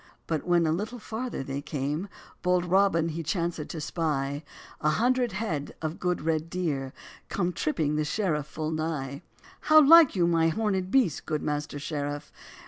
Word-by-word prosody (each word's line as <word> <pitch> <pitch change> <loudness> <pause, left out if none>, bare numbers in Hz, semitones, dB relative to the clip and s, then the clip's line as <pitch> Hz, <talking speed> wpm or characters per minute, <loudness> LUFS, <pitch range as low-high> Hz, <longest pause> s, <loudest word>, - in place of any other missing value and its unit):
But 160 0 -2
when 175 -1 +4
a 155 - +2
little 210 +9 -3
farther 230 - -4
they 135 +1 -4
came, 145 +5 -3 0.3
Bold 180 0 +2
Robin 180 -3 +3
he 165 +1 -4
chancèd 165 -1 -2
to 165 - -6
spy 145 -3 -2 0.4
A 155 - +2
hundred 245 +5 +2
head 190 -9 -3
of 155 +1 -4
good 180 -3 -1
red 160 0 0
deer, 150 -7 -2 0.4
Come 180 -2 -1
tripping 155 -2 0
the 155 - +1
sheriff 150 -2 -1
full 155 +2 -4
nigh. 155 -4 -3 0.4
"How 310 0 +6
like 315 -2 +8
you 175 -2 +3
my 165 -1 +3
horn'd 190 +1 0
beasts, 200 - +3
good 155 -1 -3
master 150 0 -2
sheriff? 145 0 -4
165 Hz, 165 wpm, -27 LUFS, 150-185 Hz, 0.4 s, like